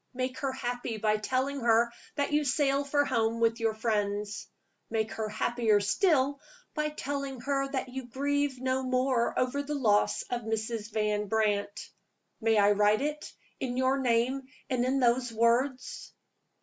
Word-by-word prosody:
Make 255 0 -2
her 270 0 -1
happy 245 -3 -3
by 215 0 +1
telling 260 +5 -1
her 235 0 +3 0.2
that 285 0 -1
you 300 0 +3
sail 275 0 +2
for 285 +1 +1
home 230 -3 0
with 230 0 +2
your 225 -1 0
friends. 210 -2 -2 0.4
Make 220 -1 -1
her 220 -1 -3
happier 220 0 +2
still 280 - +2 0.3
by 300 -1 -1
telling 280 -3 -4
her 275 +1 0
that 265 -2 -3
you 260 0 -6
grieve 285 +1 -1
no 260 0 0
more 255 -1 +1
over 255 +3 +1
the 295 +1 -4
loss 210 -7 +2
of 245 -1 -1
Mrs. 220 0 -3
Van 210 -1 0
Brandt. 205 -1 -1 0.5
May 225 0 +3
I 205 0 +5
write 210 +4 +3
it, 300 0 -3 0.3
in 250 -1 -3
your 260 +1 +2
name 250 +1 +1 0.3
and 250 -1 +1
in 260 +2 +1
those 245 0 +2
words?" 240 +4 0
245 Hz, 160 wpm, -29 LUFS, 220-270 Hz, 0.5 s, I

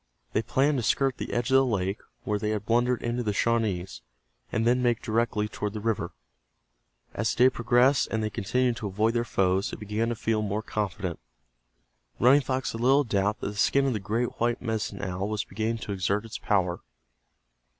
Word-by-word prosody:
They 110 - +2
planned 135 +5 +1
to - - -3
skirt 135 +3 +1
the - - -4
edge 120 +1 -1
of - - +5
the 135 - +6
lake 100 -5 -1 0.2
where 105 -4 -1
they 105 - -1
had 105 -1 -2
blundered 120 +2 +1
into 120 +1 -1
the 105 -3 -1
Shawnees, 105 -5 0 0.5
and 115 - 0
then 125 +2 +3
make 120 -2 +1
directly 110 -2 0
toward 105 -1 -4
the 110 - -4
river. 110 -1 -1 1.0
As - - -1
the 125 - +4
day 130 - +8
progressed 125 +3 +3
and 110 -1 -1
they 105 - -2
continued 120 +3 0
to 110 - -4
avoid 105 +4 +1
their 120 -1 +1
foes 95 -3 +1
they - - -6
began 105 +2 -2
to 120 - -1
feel 110 -1 0
more 105 +1 -2
confident. 100 -6 -3 1.0
Running 135 +4 +6
Fox 130 0 -2
had 115 - -6
little 135 +4 +5
doubt 105 -3 0
that - - -2
the 105 - -8
skin 135 +6 +3
of 135 - +1
the 110 - -2
great 110 +5 -2
white 120 +1 +1
Medicine 110 -4 -3
Owl 95 +1 -2
was 105 -1 -1
beginning 110 +3 -2
to - - -5
exert 100 +2 0
its 110 - -7
power. 90 -4 +1
110 Hz, 200 wpm, -27 LUFS, 105-120 Hz, 1.0 s, day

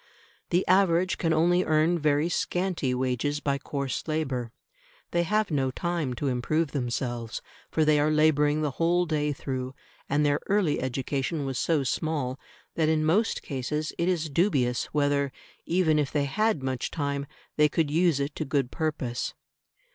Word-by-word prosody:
The 180 +2 +1
average 185 -1 +3
can 165 - +1
only 175 +3 +3
earn 160 +2 +2
very 150 +1 +2
scanty 175 -4 -1
wages 130 +3 -1
by 140 -1 -1
coarse 140 -1 -4
labour. 135 -7 -2 0.6
They 170 - +2
have 210 +3 0
no 135 -3 +1
time 160 -2 -2
to 140 - -2
improve 135 +5 0
themselves, 120 -3 -3 0.3
for 155 - +1
they 150 -1 +4
are 150 +1 +3
labouring 155 -1 +3
the 150 - 0
whole 175 +5 +2
day 150 -2 0
through; 130 -2 -4 0.3
and 145 +2 +2
their 145 0 +2
early 195 -7 +2
education 135 +4 -2
was 135 -2 -2
so 155 -4 +1
small 140 -1 -2 0.3
that 160 -1 +1
in 155 -1 +2
most 205 +8 +1
cases 150 +3 -3
it 170 +2 +2
is 170 -3 0
dubious 135 -8 +1
whether 145 -1 +1 0.4
even 165 -3 +3
if 145 -2 0
they 145 -2 +1
had 215 +2 0
much 130 -2 -2
time, 140 -2 -2 0.3
they 150 0 +4
could 155 -1 0
use 165 -2 +3
it 140 +1 -2
to - - -1
good 140 -3 -1
purpose. 145 -7 -2
150 Hz, 160 wpm, -27 LUFS, 135-165 Hz, 0.6 s, they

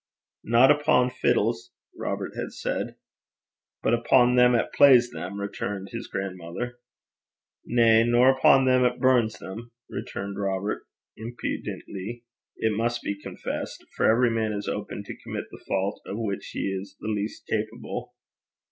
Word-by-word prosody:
'Nae 120 +5 +6
upo' 145 -4 +3
fiddles,' 125 - 0 0.2
Robert - - -3
had - - -4
said. - - -3 0.9
'But - - +2
upo' 120 +1 +4
them 125 0 +6
'at 115 - 0
plays 125 -4 +6
them,' 95 +3 -6
returned 100 -1 -4
his 115 0 -6
grandmother. 95 +6 -5 0.9
'Na; 115 -2 +5
nor 125 +3 +5
upo' 130 0 +5
them 130 -1 +4
'at 125 0 +2
burns 125 -4 +3
them,' 115 +5 -9 0.2
retorted 100 0 -5
Robert 100 +1 -2 0.3
impudently 115 -1 -5 0.3
it 110 -1 0
must 120 +2 -1
be - - -1
confessed; - - -6
for - - +2
every 120 +1 +3
man 110 -1 0
is 100 0 -4
open - - -4
to - - -8
commit - - -5
the - - -12
fault 95 +1 -1
of 100 - -4
which 105 -4 -3
he 95 - -2
is 100 - -13
least 105 0 -3
capable. 110 +2 -4
115 Hz, 140 wpm, -26 LUFS, 100-125 Hz, 0.9 s, Nae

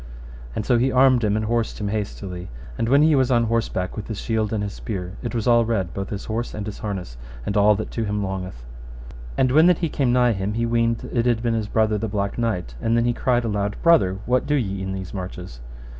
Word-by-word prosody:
And 105 - -2
so 120 -2 +3
he 130 +2 +2
armed 130 -2 +4
him 105 -1 +2
and 110 - -1
horsed 115 0 -1
him 105 -1 -2
hastily. 100 -3 -4 0.3
And 115 - -1
when 140 +3 +5
he 155 0 +5
was 130 -3 +3
on 120 -2 +3
horseback 115 -5 -1
with 105 - -6
his 110 -3 -5
shield 110 -2 -1
and 105 -2 -1
his 100 -1 -4
spear, 95 -3 -5
it 120 0 -4
was 115 - -1
all 120 -1 +5
red, 100 -7 -1
both 100 -1 -4
his 100 -1 -5
horse 115 +2 -3
and 105 -1 -4
his 105 - -6
harness, 95 - -5 0.3
and - - -2
all 105 0 +5
that 110 - -5
to 115 - -2
him 105 0 -1
longeth. 95 -10 -5 0.7
And 130 - +3
when 155 +5 +6
that 180 -2 +5
he 165 - -1
came 135 -4 +1
nigh 125 -1 +4
him 100 +1 -3
he 115 +1 0
weened 115 0 0
it 120 0 +1
had 120 -1 +1
been 115 -1 +1
his 110 -2 -1
brother 110 -1 +1
the 110 - -2
Black 100 +1 -2
Knight; 100 - -1
and 115 +1 +2
then 115 - +2
he 120 - +2
cried 120 0 +1
aloud, 105 -2 -1
Brother, 150 - +4
what 125 +1 +1
do 150 - +2
ye 100 -8 -1
in 95 0 -3
these 95 -1 -6
marches? 90 -8 -7
110 Hz, 250 wpm, -23 LUFS, 100-120 Hz, 0.7 s, when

